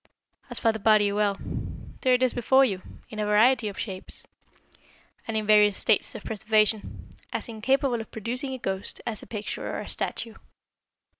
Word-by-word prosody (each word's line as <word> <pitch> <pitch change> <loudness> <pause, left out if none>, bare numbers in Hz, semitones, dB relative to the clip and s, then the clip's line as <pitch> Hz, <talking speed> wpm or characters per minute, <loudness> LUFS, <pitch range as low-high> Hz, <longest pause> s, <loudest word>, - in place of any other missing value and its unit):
As 245 - 0
for 225 - +3
the 220 - -6
body 210 -1 +4
well, 205 -1 +1 0.6
there 255 -1 +4
it 250 - +1
is 255 - +2
before 265 +3 +4
you, 195 -6 -2 0.3
in 215 - -7
a 210 - 0
variety 225 +3 +4
of 200 - -6
shapes, 190 -3 -6 1.0
and 225 -1 -1
in 215 - -1
various 210 -1 +5
states - - +2
of - - -7
preservation, 215 0 0 0.2
as - - -3
incapable 245 +2 0
of 220 - -10
producing 250 +5 -2
a - - -6
ghost 195 -4 -3
as 225 -4 -4
a - - -12
picture 210 -2 -5
or - - -3
a - - -6
statue. 230 -1 -4
220 Hz, 175 wpm, -26 LUFS, 210-245 Hz, 1.0 s, various